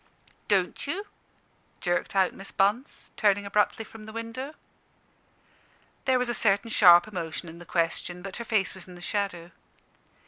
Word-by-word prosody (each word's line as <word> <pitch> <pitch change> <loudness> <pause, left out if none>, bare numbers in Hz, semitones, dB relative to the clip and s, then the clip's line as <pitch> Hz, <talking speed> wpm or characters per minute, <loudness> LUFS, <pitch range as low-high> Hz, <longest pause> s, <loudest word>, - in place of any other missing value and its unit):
"Don't 195 +5 +1
you?" 380 +8 -3 0.7
jerked 175 +2 -1
out 190 -2 +3
Miss 195 - -7
Bunce, 210 +8 0
turning 205 -2 +3
abruptly 210 +2 +1
from 215 -1 -12
the - - -7
window. 230 +6 -6 1.5
There 260 -1 +4
was 250 0 0
a 240 - 0
certain 215 0 +2
sharp 175 -3 +7
emotion 175 -4 -5
in 165 +1 -10
the 175 - -12
question, 175 +1 -1
but 195 -1 -6
her 235 - -4
face 220 -4 +1
was 190 -1 -10
in 180 - -11
the 175 - -12
shadow. 180 -5 -2
200 Hz, 160 wpm, -27 LUFS, 180-225 Hz, 1.5 s, sharp